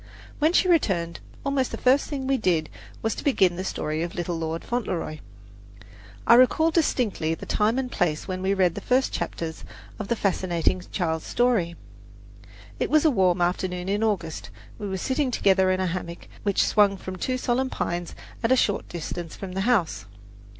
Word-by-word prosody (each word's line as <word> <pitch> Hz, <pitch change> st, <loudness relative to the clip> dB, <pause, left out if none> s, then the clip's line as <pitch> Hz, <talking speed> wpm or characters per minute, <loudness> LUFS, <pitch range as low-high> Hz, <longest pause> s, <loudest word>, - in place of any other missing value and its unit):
When 310 Hz, +2 st, +4 dB
she 365 Hz, -, +3 dB
returned 185 Hz, -, +1 dB, 0.3 s
almost 275 Hz, -2 st, +1 dB
the -, -, -5 dB
first 260 Hz, +3 st, +3 dB
thing 275 Hz, -3 st, -3 dB
we 270 Hz, 0 st, +2 dB
did 170 Hz, -8 st, 0 dB, 0.3 s
was 220 Hz, -1 st, +1 dB
to -, -, -7 dB
begin 190 Hz, -11 st, +3 dB
the 185 Hz, -, -4 dB
story 155 Hz, -4 st, -2 dB
of 170 Hz, 0 st, -4 dB
"Little 175 Hz, 0 st, -2 dB
Lord 165 Hz, 0 st, -3 dB
Fauntleroy." 185 Hz, -10 st, -3 dB, 1.1 s
I -, -, +7 dB
recall 255 Hz, +7 st, +5 dB
distinctly 230 Hz, -, +1 dB
the -, -, -9 dB
time 215 Hz, +4 st, +1 dB
and 255 Hz, -2 st, -2 dB
place 160 Hz, -5 st, -1 dB
when 185 Hz, -1 st, -3 dB
we 195 Hz, +1 st, +1 dB
read 185 Hz, -3 st, +3 dB
the -, -, -6 dB
first 255 Hz, +1 st, +1 dB
chapters 160 Hz, -1 st, -4 dB, 0.4 s
of -, -, -4 dB
the 235 Hz, -, +1 dB
fascinating 185 Hz, -4 st, 0 dB
child's 160 Hz, -4 st, -2 dB
story. 225 Hz, -9 st, +1 dB, 1.0 s
It -, -, 0 dB
was 310 Hz, +1 st, +4 dB
a 310 Hz, -, +6 dB
warm 185 Hz, -6 st, +2 dB
afternoon 180 Hz, +1 st, -1 dB
in 205 Hz, +2 st, 0 dB
August. 200 Hz, -7 st, -2 dB, 0.3 s
We 205 Hz, -, -4 dB
were 190 Hz, -, -2 dB
sitting 260 Hz, +7 st, 0 dB
together 190 Hz, -5 st, +3 dB
in 185 Hz, 0 st, +1 dB
a 185 Hz, -, +1 dB
hammock 170 Hz, -1 st, -5 dB
which 200 Hz, -2 st, +2 dB
swung 205 Hz, -2 st, +3 dB
from 185 Hz, 0 st, -7 dB
two 255 Hz, +6 st, -1 dB
solemn 255 Hz, +1 st, 0 dB
pines 175 Hz, -6 st, -3 dB, 0.3 s
at 230 Hz, -, +1 dB
a -, -, +7 dB
short 205 Hz, -5 st, 0 dB
distance 170 Hz, 0 st, -5 dB
from 195 Hz, -2 st, -7 dB
the 190 Hz, +1 st, -2 dB
house. 185 Hz, -, +1 dB
190 Hz, 185 wpm, -25 LUFS, 175-250 Hz, 1.1 s, I